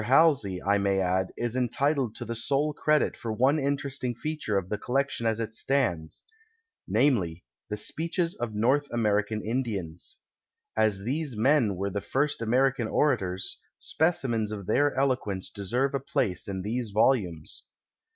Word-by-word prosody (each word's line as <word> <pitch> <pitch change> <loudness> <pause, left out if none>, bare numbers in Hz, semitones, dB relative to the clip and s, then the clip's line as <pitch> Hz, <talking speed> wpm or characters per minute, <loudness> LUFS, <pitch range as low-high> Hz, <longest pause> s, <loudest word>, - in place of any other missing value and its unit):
Halsey, 125 - +4
I 100 +1 +3
may 100 -1 +2
add, 95 0 +1
is 120 0 -2
entitled 130 0 +1
to 120 - -5
the 115 - -3
sole 140 +6 0
credit 150 +1 +2
for 115 - -5
one 130 +7 +3
interesting 140 -3 -2
feature 150 -7 -2
of 95 -2 -2
the 105 - -2
collection 135 -1 0
as 110 0 0
it 110 -1 -3
stands 110 - 0 0.3
— 450 - -46 0.2
namely, 105 - +2 0.3
the 105 - -2
speeches 165 - -1
of 115 -3 -4
North 130 +7 +2
American 105 -2 0
In 125 +4 0
dians. 90 -8 -4 0.6
As 110 -3 +2
these 135 +1 -2
men 120 -4 +3
were 100 +2 -2
the 100 - -2
first 140 +3 0
American 125 +1 +2
ora 150 +6 +3
tors, 95 0 -4 0.2
specimens 125 -10 0
of 100 -3 -5
their 145 +7 +2
eloquence 125 -8 -1
deserve 120 +7 -1
a 140 - +1
place 105 -8 -1
in 95 -2 -4
these 115 +2 -2
volumes. 100 - +1
115 Hz, 160 wpm, -28 LUFS, 100-135 Hz, 0.6 s, Halsey